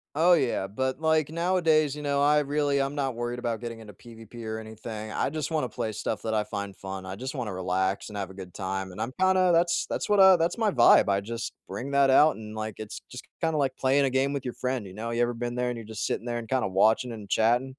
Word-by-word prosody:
Oh 175 +3 +5
yeah, 120 - +1
but, 130 +8 -2
like, 160 -2 +2
nowadays, 165 -4 +2
you 150 - -7
know, 140 -1 0
I 150 +1 +4
really 145 -1 +1
I'm 140 +2 -2
not 135 -3 -1
worried 120 +1 -3
about 115 -2 -3
getting 115 -1 -6
into 105 -2 -11
PvP 115 +2 -12
or 110 0 -4
anything, 110 0 -7
I - - 0
just 155 +1 -4
wanna 150 -6 0
play 110 - -3
stuff 110 +1 -4
that 110 -1 -2
I 105 -1 +2
find 100 -2 -5
fun, 95 -1 -7
I 95 +1 -6
just 130 +6 -6
wanna 115 -7 -3
relax 95 +2 -1
and 105 - -7
have 95 -1 -4
a - - -12
good 95 -2 -9
time 95 0 -3
and - - -11
I'm 125 - -2
kinda 185 -1 +4
that's 170 0 +2
that's - - -3
what 205 -1 +4
I 190 -1 +9
that's 165 +6 0
my 220 -2 +2
vibe, 120 -5 +6
I 100 0 +2
just 115 +3 -5
bring 140 +3 -5
that 140 -1 +4
out 150 +2 +5
and, 110 0 -9
like, 110 -1 -4
it's 110 -1 -6
it's - - -10 0.2
just - - -26
kinda 160 -2 0
like 135 -2 0
playing 135 +1 +3
a - - +1
game 135 +2 +1
with 135 -2 -4
your 125 - -4
friend, 125 -5 -2
you 95 - -11
know? 115 +2 -4
You 120 +1 0
ever 120 0 +1
been 120 0 -3
there 125 0 -1
and 120 - -4
you're 115 - -8
just 110 0 -4
sitting 120 - -3
there 120 0 -2
and 115 - -9
kinda 130 -6 +1
watching 110 +6 +2
and 105 -4 -9
chatting? 120 +6 +2
120 Hz, 270 wpm, -27 LUFS, 110-145 Hz, 0.2 s, I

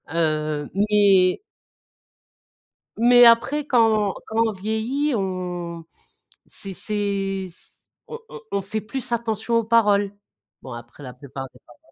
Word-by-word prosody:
Heu, 155 -2 -1
mais 200 -2 +4 1.6
mais 245 +1 +7
après 255 +6 +4
quand 220 -6 +3
quand 220 - -5
on - - -1
vieillit 220 +9 -2
on 180 -4 -4 0.6
c'est 195 -1 -6
c'est 195 -1 -2
c 170 - -13 0.2
on 460 - -7
on - - -9
on 200 0 0
fait 215 +3 -4
plus 255 +3 -6
attention 230 0 -1
aux 230 - +1
paroles. 205 -3 +3 0.5
Bon, 130 - -9
après 120 +4 -11
la 125 -2 -8
plupart 135 +1 -8
des - - -19
paroles 120 - -19
205 Hz, 130 wpm, -23 LUFS, 175-225 Hz, 1.6 s, mais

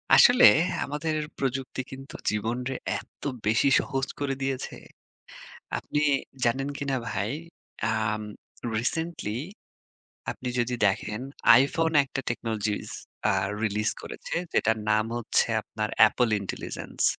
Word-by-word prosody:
আসলে 245 0 +8 0.4
আমাদের 150 +2 -2 0.2
প্রযুক্তি 130 -1 -2
কিন্তু 135 +1 -9
জীবনরে 120 +5 -2 0.2
এত - - -17 0.2
বেশি 110 +6 +4
সহজ 135 -1 -1
করে 140 -1 0
দিয়েছে। 135 -1 -2 1.0
আপনি 150 - -2 0.4
জানেন 135 +4 +1
কিনা 140 -2 -1
ভাই, 105 +4 -1 0.6
আম 110 -1 0 0.6
রিসেন্টলি 125 -2 -2 0.9
আপনি 125 - -5
যদি 120 +1 0
দেখেন 105 +3 -2 0.4
iphone 160 +4 +1
একটা 135 0 -4
টেকনোলজিস 110 -3 -2 0.4
আ - - +1 0.3
রিলিজ 105 0 +1
করেছে - - -6 0.2
যেটার 110 +1 +3
নাম 110 0 +3
হচ্ছে 120 - +2 0.2
আপনার 105 0 -4 0.2
Apple 125 -2 +1
Intelligence। 95 - -4
125 Hz, 110 wpm, -27 LUFS, 110-135 Hz, 1.0 s, আসলে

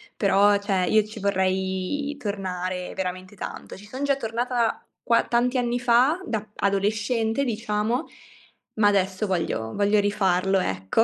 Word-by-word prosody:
Però, 200 0 +4
cioè, 195 -2 0
io 215 +4 +4
ci 215 0 -10
vorrei 190 +8 -1
tornare 185 -5 -4
veramente 185 +1 -4
tanto. - - -7
Ci 205 - -13
sono 260 +6 -6
già 280 - +3
tornata 235 -1 -1 0.2
qua 230 - +3
tanti 245 +2 +1
anni 245 0 0
fa, 255 +9 +3
da 215 - -3
adolescente, 215 +5 0
diciamo, 225 0 -1 0.7
ma, 215 -1 +4
adesso, 195 0 +1
voglio 160 -11 -2
voglio 205 +1 +3
rifarlo, 195 -2 +2
ecco. 95 - +1
205 Hz, 135 wpm, -25 LUFS, 190-235 Hz, 0.7 s, Però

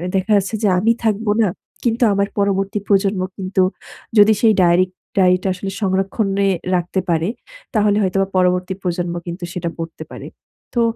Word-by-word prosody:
দেখা 190 +3 0
যাচ্ছে 195 +3 -1
যে, - - +4
আমি 225 +4 +3
থাকব 220 0 0 0.2
না, 205 - +3 0.3
কিন্তু 235 0 +1
আমার 200 0 +1
পরবর্তী 195 0 0
প্রজন্ম 195 -1 +2 0.2
কিন্তু 190 0 0 0.6
যদি 210 +1 +7
সেই 220 -2 +5
ডায়েরিক 180 +1 +4 0.3
ডায়েরিটা 185 0 +3
আসলে 195 +1 -5
সংরক্ষণে 195 +1 0 0.3
রাখতে 180 +2 -1
পারে, 165 +1 +1 0.5
তাহলে 210 -1 +3
হয়তো 190 0 0
বা 195 - 0
পরবর্তী 180 +1 +1
প্রজন্ম 175 -1 -2
কিন্তু 175 +1 -6
সেটা 170 -1 -3
পড়তে 165 0 -7
পারে। - - -8 0.5
তো, 235 - +3
195 Hz, 160 wpm, -19 LUFS, 180-205 Hz, 0.6 s, যদি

